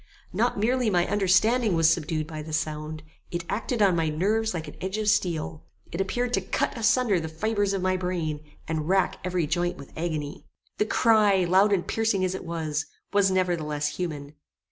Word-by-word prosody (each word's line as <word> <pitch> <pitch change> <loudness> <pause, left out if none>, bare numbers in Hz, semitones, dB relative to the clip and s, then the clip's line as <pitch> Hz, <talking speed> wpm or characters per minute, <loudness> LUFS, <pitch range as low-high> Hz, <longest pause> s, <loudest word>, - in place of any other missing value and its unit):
Not - - +1
merely 240 +3 +1
my 175 -3 +2
understanding 205 +3 +3
was 165 -1 +4
subdued 155 -1 -2
by 155 -1 -7
the 155 +1 -8
sound: 155 0 -3 0.3
it 170 0 -4
acted 225 +1 -1
on 190 -3 +4
my 165 -2 +1
nerves 215 +8 +1
like 165 -3 -4
an - - -9
edge 190 +3 -3
of 215 -1 -2
steel. 160 - 0 0.3
It 170 - -2
appeared 245 +5 -1
to 195 - +2
cut 185 - -1
asunder 230 -3 +2
the 160 -1 -4
fibres 205 +4 0
of 195 -2 -2
my 185 0 +1
brain, 175 -5 -2 0.3
and 160 0 -2
rack 190 0 +2
every 180 -2 0
joint 175 +3 -1
with 140 - -12
agony. 155 -3 -4 0.3
The 210 - +2
cry, 210 -5 +4
loud 190 +4 +4
and 190 -3 +1
piercing 220 -4 +1
as 185 - -1
it 190 - -6
was, 155 -2 -2 0.3
was 200 -1 +4
nevertheless 160 -6 0
human. 150 -5 -4
180 Hz, 190 wpm, -26 LUFS, 160-205 Hz, 0.3 s, was